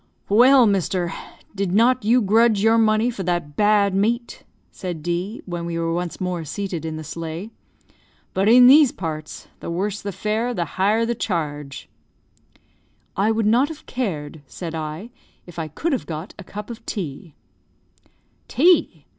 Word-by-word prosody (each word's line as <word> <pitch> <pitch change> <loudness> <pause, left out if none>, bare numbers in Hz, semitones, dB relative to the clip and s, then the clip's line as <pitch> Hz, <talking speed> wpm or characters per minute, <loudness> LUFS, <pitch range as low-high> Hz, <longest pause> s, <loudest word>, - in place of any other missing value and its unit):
"Well, 250 +5 +6
mister; 185 -3 0 0.4
did 195 -3 -2
not 245 +2 +3
you 235 +3 +3
grudge 220 +1 +4
your 225 +1 +4
money 220 +2 +3
for 215 - -6
that 175 -5 -2
bad 205 0 +3
meat?" 230 +5 -1 0.3
said 175 -5 -6
D, 175 +6 -3
when 175 -2 -5
we 170 -1 -3
were 165 0 -1
once 175 0 -3
more 180 -2 -3
seated 170 +1 -4
in 160 -1 -4
the 155 - -6
sleigh. 165 +6 -6 0.8
"But 195 +3 +2
in 245 +2 +8
these 275 +1 +7
parts, 155 -3 -6
the - - -7
worse 195 +4 -2
the 200 - -4
fare 220 +5 -2
the 175 - -1
higher 210 +6 +1
the 235 - -1
charge." 150 - -4 1.3
"I 200 +3 +2
would 225 -1 +1
not 240 +6 +4
have 320 -1 -10
cared," 160 - -4
said 165 +4 -7
I, 160 +8 -5 0.3
"if 175 -1 -10
I 160 - -3
could 300 - -2
have 260 - -3
got 160 +3 -6
a - - -7
cup 210 +5 -8
of 235 - -10
tea." 160 - -6 1.1
"Tea! 290 - +3
195 Hz, 165 wpm, -22 LUFS, 170-225 Hz, 1.3 s, in